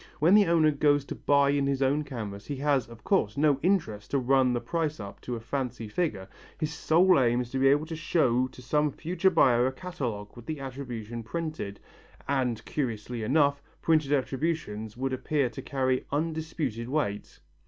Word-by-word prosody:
When 165 +5 +4
the 210 -1 +6
owner 160 -2 +4
goes 145 -1 +2
to - - -5
buy 140 -1 +3
in 140 -1 +1
his 140 -1 +1
own 140 +3 +2
canvas, 110 -8 -7
he 145 - -3
has, 140 -1 +1
of 115 -2 -14
course, 105 +3 +1
no 145 -2 +3
interest 150 - 0
to 140 - +1
run 130 0 +3
the 120 - 0
price 155 +5 -2
up 100 -1 -8
to 125 - -4
a - - -5
fancy 120 -1 -4
figure, 105 - -2 0.3
his 155 -1 -2
sole 170 +3 +4
aim 120 -1 +3
is 120 -1 -7
to 135 - -1
be 135 - +4
able 145 +3 +4
to 160 0 -6
show 130 -6 +2
to 130 - -14
some 150 +4 +1
future 180 +6 +1
buyer 125 -7 +4
a - - -1
catalogue 125 - -5
with 120 -1 -12
the 155 -2 -4
attribution 125 -4 -6
printed 155 -6 -5 0.5
and, 125 -5 -1
curiously 120 -4 -3
enough, 140 +4 +2 0.2
printed 155 -4 +2
attributions 130 -6 -2
would 135 +1 -2
appear 130 0 0
to - - -7
carry 130 -2 -1
undisputed 155 -6 -2
weight! 130 -9 -2
135 Hz, 185 wpm, -28 LUFS, 120-150 Hz, 0.5 s, the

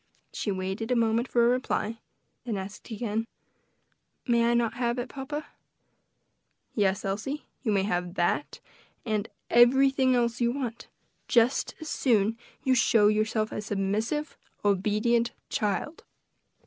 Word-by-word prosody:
She - - -3
waited 190 +3 -3
a 250 - +2
moment 230 +1 +2
for 235 -2 +3
a - - +5
reply; 235 -3 -1 0.4
then 230 -4 -3
asked 195 +5 -8
again, 225 0 -2 1.0
"May 235 -2 +3
I 240 - +3
not 235 -2 +1
have 240 -1 -1
it, 245 0 -3
papa?" 290 +2 -5 1.3
"Yes, 200 -1 +1
Elsie, 220 +10 -3 0.2
you 225 - 0
may 195 -2 +2
have 180 -2 -2
that, 175 +11 0 0.5
and 215 -2 -1 0.2
everything 260 +2 +5
else 235 0 0
you 235 0 +3
want, 245 -4 -5 0.4
just 240 +2 +2
as 315 - -7
soon 220 -6 +2
as - - -3 0.3
you 260 - +3
show 225 -4 +5
yourself 215 0 0
a - - -3
submissive, 215 +9 -2 0.3
obedient 215 +4 +2 0.2
child." 215 +9 -2
230 Hz, 135 wpm, -28 LUFS, 210-245 Hz, 1.3 s, a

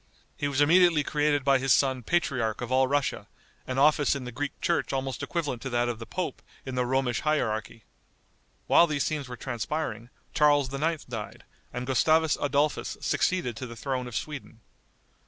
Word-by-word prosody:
He 145 - -2
was 140 0 0
immediately 165 0 +5
created 145 -1 +1
by 135 -1 +4
his 135 0 0
son 130 -2 +3
patriarch 125 -6 0
of 125 0 -5
all 130 0 +4
Russia, 140 0 -1 0.4
an 130 - -3
office 145 +1 +4
in 140 - -5
the 125 - -6
Greek 145 +4 -4
church 170 -2 0
almost 135 -1 -3
equivalent 150 -9 -3
to 135 - -4
that 120 0 +1
of 120 -2 -3
the 115 - -8
pope 185 -2 -4 0.2
in 130 - -5
the 125 -1 0
Romish 130 -2 0
hierarchy. 110 -8 -1 0.8
While 170 - +6
these 145 -3 0
scenes 145 -4 -3
were 125 - -7
transpiring, 120 -1 -4 0.2
Charles 145 -3 +3
IX. 155 +2 -1
died, 110 -4 -7 0.3
and 125 0 -4
Gustavus 155 +4 +3
Adolphus 145 +1 0
succeeded 175 -11 0
to 130 - -5
the 115 - -9
throne 130 0 -3
of 120 - -8
Sweden. 140 -6 -6
135 Hz, 175 wpm, -27 LUFS, 125-150 Hz, 0.8 s, While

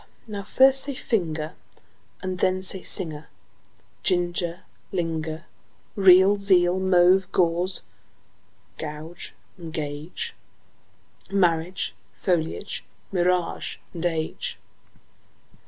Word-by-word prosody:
) - - -35
Now 205 -2 -5
first 265 +5 +5
say: 280 -2 -4
finger, 160 -10 -2 0.7
And 185 -1 -3
then: 185 0 +1
singer, 175 -4 +1 0.7
ginger, 175 0 0 0.3
linger. 165 -3 -3 0.5
Real, 190 0 +7
zeal; 185 -2 +3
mauve, 185 0 +4
gauze 180 +1 +1 1.0
and 155 +2 -7 0.4
gauge; 155 - -4 1.0
Marriage, 180 -2 +1 0.2
foliage, 175 +2 -2 0.3
mirage, 180 -2 0 0.3
age. 160 -2 -2
180 Hz, 75 wpm, -25 LUFS, 165-190 Hz, 1.0 s, Real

